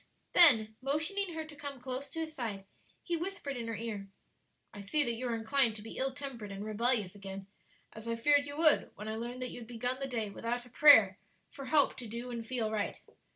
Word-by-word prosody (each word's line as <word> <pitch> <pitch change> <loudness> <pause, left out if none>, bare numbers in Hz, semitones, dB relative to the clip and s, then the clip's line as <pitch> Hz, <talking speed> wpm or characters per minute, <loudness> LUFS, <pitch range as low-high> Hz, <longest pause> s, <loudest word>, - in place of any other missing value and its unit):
Then 220 -10 +6
motioning 325 +7 -1
her 320 -1 -4
to 310 -1 -12
come 285 -2 -7
close 260 +2 -5
to 325 - -4
his 315 -1 -4
side, 210 -8 -4 0.4
he 345 - -1
whispered 340 -5 -4
in 235 -2 -5
her 230 - -3
ear, 210 -2 -5 0.7
"I 205 - -8
see 290 +10 +2
that 235 - -1
you 250 +2 -4
are 235 - -1
inclined 230 0 +2
to 210 - -8
be 225 - -8
ill 265 +1 0
tempered 260 -7 -6
and 200 +1 -6
rebellious 215 -2 0
again, 195 -1 -8 0.5
as 220 +1 -10
I 230 - 0
feared 285 +4 +3
you 285 +1 -7
would, 315 -2 +4
when 210 +2 -8
I 220 - -3
learned 240 +3 -5
that 250 - -4
you - - -8
had 230 - -10
begun 245 +2 -3
the 275 - -3
day 225 -5 -3
without 240 +4 -3
a - - -15
prayer 220 -8 +7 0.3
for 275 - -8
help 290 +1 +3
to 245 - -7
do 235 +3 -6
and 235 -1 -4
feel 225 -2 -2
right. 215 -2 -2
245 Hz, 230 wpm, -32 LUFS, 220-285 Hz, 0.7 s, prayer